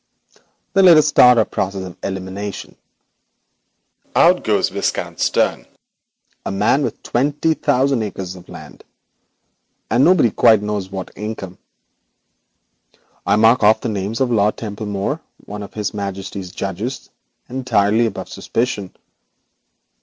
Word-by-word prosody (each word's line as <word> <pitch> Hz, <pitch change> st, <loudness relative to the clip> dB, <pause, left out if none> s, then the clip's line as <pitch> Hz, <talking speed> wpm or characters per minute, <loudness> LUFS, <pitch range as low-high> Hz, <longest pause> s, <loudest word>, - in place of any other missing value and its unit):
'Then 195 Hz, 0 st, +5 dB
let 170 Hz, -3 st, +8 dB
us 155 Hz, -, +4 dB
start 125 Hz, -4 st, +6 dB
our 110 Hz, -, +4 dB
process 95 Hz, 0 st, -3 dB
of 90 Hz, -2 st, -8 dB
elimination. 95 Hz, +1 st, -6 dB, 1.4 s
Out -, -, +5 dB
goes -, -, +1 dB
Viscount -, -, -3 dB
Stern, -, -, 0 dB, 0.8 s
a -, -, -4 dB
lucky 95 Hz, -, -4 dB
individual 115 Hz, +8 st, +2 dB
with -, -, -6 dB
twenty 145 Hz, +5 st, 0 dB
thousand 135 Hz, -4 st, +1 dB
acres 95 Hz, -3 st, -5 dB
of 90 Hz, -1 st, -14 dB
land, -, -, -12 dB, 1.1 s
and 120 Hz, +4 st, +4 dB
God 185 Hz, +3 st, +5 dB
only 110 Hz, -2 st, +4 dB
knows 105 Hz, -3 st, -3 dB
what 95 Hz, -1 st, -6 dB
income. 105 Hz, -4 st, -7 dB, 1.7 s
I 100 Hz, -, +4 dB
mark 115 Hz, +3 st, +4 dB
off 110 Hz, +1 st, +4 dB
the 120 Hz, -, -2 dB
name 100 Hz, 0 st, -3 dB
of 120 Hz, +1 st, 0 dB
Lord 105 Hz, -2 st, +2 dB
Templemere, 105 Hz, +5 st, -4 dB, 0.3 s
one 105 Hz, +1 st, -7 dB
of 100 Hz, -, -10 dB
His 105 Hz, -2 st, -3 dB
Majesty's 100 Hz, -2 st, -5 dB
judges, 100 Hz, +8 st, -5 dB, 0.4 s
entirely 115 Hz, -3 st, +1 dB
above 100 Hz, -, -6 dB
suspicion. 110 Hz, -6 st, -3 dB
105 Hz, 130 wpm, -19 LUFS, 100-125 Hz, 1.7 s, let